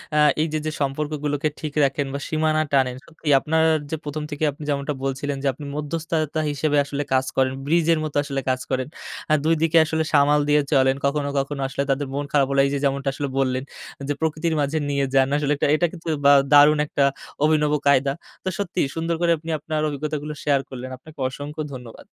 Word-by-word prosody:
আ - - +4 0.2
এই 160 - +1
যে, - - +1
যে, 155 - -1
সম্পর্কগুলোকে 145 +1 -1
ঠিক 150 -2 -5
রাখেন 140 +1 +1
বা 140 - -3
সীমানা 155 0 +1
টানেন 130 -2 +2
সত্যি 160 -1 -13
আপনার 160 +3 +1 0.3
যে - - 0
১ম 150 +1 -4
থেকেই 150 +1 0
আপনি 145 +2 -11
যেমনটা 140 +1 -1
বলছিলেন 135 +1 -2
যে, - - +1
আপনি 145 +3 -10
মধ্যস্থতা 155 +1 -2
হিসেবে 145 +1 0
আসলে 140 +1 -3
কাজ 130 0 +3
করেন, 130 0 +2
ব্রিজের 165 +1 +3
মতো 150 -2 -5
আসলে 140 -1 -3
কাজ 130 0 +1
করেন। 130 0 0 0.4
আ - - +6
২ 165 0 +4
দিকে 165 0 +3
আসলে 160 0 0
সামাল 145 +1 +5
দিয়ে 150 0 +5
চলেন। 130 -1 +4
কখনো, 140 0 0
কখনো, 140 0 -3
আসলে 135 +1 -2
তাদের 135 +1 -1
মন 145 0 -2
খারাপ 140 -2 +3
হলে 135 0 +4
এই - - +1
যে 140 - 0
যেমনটা 140 0 0
আসলে 140 0 -3
বললেন 130 0 0 0.5
যে - - +2
প্রকৃতির 160 +1 0
মাঝে 145 +3 0
নিয়ে 140 -1 +1
যান। 135 -1 +4
আসলে 150 0 +1
এক - - -15
এটা 175 - +2
কিন্তু 165 -2 -11 0.2
বা 140 - +8 0.2
দারুণ 145 +1 +7
একটা 140 - +1 0.4
অভিনব 150 -1 +3 0.2
কায়দা। 135 0 +4 0.3
তো 190 - -1
সত্যিই 185 -7 -1
সুন্দর 165 +1 -1
করে 170 -1 +3
আপনি 165 +2 -9
আপনার 155 +1 -2
অভিজ্ঞতাগুলো 150 +1 -4
শেয়ার 140 -2 +3
করলেন। 130 0 -7
আপনাকে 150 +3 -16
অসংখ্য 145 +4 -6
ধন্যবাদ। 125 -3 -11
145 Hz, 205 wpm, -23 LUFS, 140-155 Hz, 0.5 s, বা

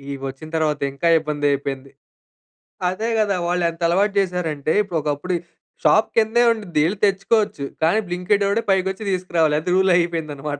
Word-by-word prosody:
ఇవొచ్చిన 135 +3 -7
తరువాత 150 -2 0
ఇంకా 155 +5 -1
ఇబ్బందయిపోయింది. 140 -3 -2 1.0
అదే 220 +5 -3
గదా! 205 -2 +1
వాళ్ళెంతలవాటు 175 +3 +1
జేశారంటే 170 -6 -1
ఇప్పుడు 180 -4 -4
ఒకప్పుడు 150 +5 -2 0.5
షాప్ - - +4
కిందే 225 +2 +3
ఉండిద్ధి. 185 -9 -1
యెళ్లి 190 +4 -2
తెచ్చుకోవచ్చు. 195 -5 0 0.2
కానీ 175 +7 +3
బ్లింకి‌ట్ 180 +3 0
వోడే 205 +3 +1
పైకొచ్చి 190 +2 0
తీసుకురావాలి. 170 -4 +1
అది 180 - -4
రూల్ 190 0 +3
అయిపోయిందన్నమాట 150 -4 -3
175 Hz, 130 wpm, -21 LUFS, 150-195 Hz, 1.0 s, షాప్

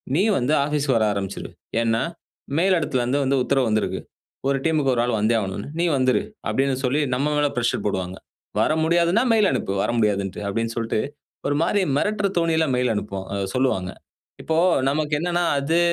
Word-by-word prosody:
நீ 180 - +3 0.2
வந்து 130 +5 +1
ஆஃபீஸ் 150 -1 -1
வர 115 -2 +3
ஆரம்பிச்சுரு. 100 -1 -4 0.3
ஏன்னா, 115 0 +1 0.6
மேல் 185 +2 +4
இடத்துலருந்து 130 -3 0
வந்து 135 +1 +1
உத்தரவு 135 -1 +1
வந்திருக்கு. 110 -1 0 0.5
1 140 0 +2
டீம் 160 -1 +2
க்கு 135 - +2
1 120 - +1
ஆள் 120 -2 0
வந்தே 110 +2 +2
ஆகணும்னு. 100 0 -4
நீ 175 - +2
வந்துரு 130 -1 +2 0.3
அப்படின்னு 135 0 +1
சொல்லி 135 +4 +1
நம்ம 140 +4 0
மேல 145 0 +3
பிரஷர் 120 -1 0
போடுவாங்க. 95 -2 -2 0.4
வர - - +2
முடியாதுன்னா 170 +7 +3
மெயில் 215 -3 +4
அனுப்பு, 95 - -1
வர - - 0
முடியாதுன்னுட்டு 100 -3 0
அப்படின்னு 115 +3 -2
சொல்லிட்டு, 115 -2 -1 0.5
ஒரு 145 - +1
மாதிரி 195 +4 +2 0.2
மிரட்டுற 210 +3 +1
தோணில 165 -1 +2
மெயில் 125 -1 +1
அனுப்பச் 100 -1 -4
சொல்லுவாங்க. 110 -9 0 0.5
இப்போ 160 0 0 0.3
நமக்கு 150 +1 -1
என்னன்னா, 175 +1 0 0.2
அது 160 +5 +1
130 Hz, 170 wpm, -23 LUFS, 110-160 Hz, 0.6 s, மேல்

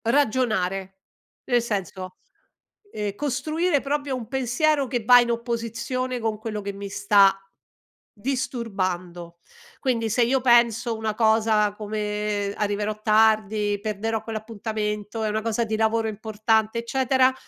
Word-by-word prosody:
Ragionare. 215 -7 +1 0.5
Nel 245 -1 +2
senso, 190 -4 -4 0.8
ehm, 205 -2 -3
costruire 305 - 0
proprio 285 -1 -2
un 240 -3 -6
pensiero, 270 +3 +1
che 245 -3 -2
va 245 +3 +8
in 240 -1 +1
opposizione 235 +2 -3
con 225 -2 -2
quello 215 -1 -4
che 200 0 -5
mi 200 0 -7
sta, 200 -1 +4 0.8
disturbando. 185 -8 -3 0.4
Quindi, 230 -4 0
se 235 +3 +2
io 260 +3 +2
penso 235 -1 +3
una 220 -1 -2
cosa, 220 -2 +3
come: 210 -1 -2
"Arriverò 210 +1 -1
tardi, 215 -1 +2
perderò 215 +1 -2
quell'appuntamento, 215 -1 -4
è 215 - 0
una 215 +1 -1
cosa 230 +1 0
di 220 0 -2
lavoro 225 0 +1
importante", 220 +1 0
eccetera, 260 +2 +2
220 Hz, 125 wpm, -24 LUFS, 210-240 Hz, 0.8 s, va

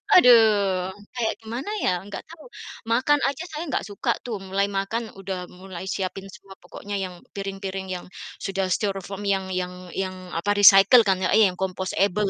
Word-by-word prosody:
Aduh, 245 -10 +9 0.7
kayak 230 -3 0
gimana 235 - -5
ya? - - +3 0.2
Nggak 205 - -7
tahu. 330 +4 -13 0.5
Makan 285 +5 +3
aja 280 +4 -3
saya 310 +2 -4
nggak - - -1
suka 200 - -1
tuh, 230 -4 -3
mulai 195 +1 +1
makan 220 +4 -2 0.2
udah 190 -1 -4 0.2
mulai 190 -1 -8
siapin 190 0 -4
semua 195 -1 -14
pokoknya 205 0 -7
yang, 180 -1 -6 0.2
piring-piring 195 -1 -5
yang, 175 - -8 0.4
sudah 195 0 -1
styrofoam 195 +1 -2
yang 190 -1 -2
yang 180 0 -2 0.2
yang, 190 -1 -2 0.2
apa, 205 +5 0
recycle 200 +4 +8
kan 190 -1 +3
ya - - +1
iya 220 -1 +7
yang 180 - -14
compostable 190 +1 0
195 Hz, 165 wpm, -24 LUFS, 190-220 Hz, 0.7 s, Aduh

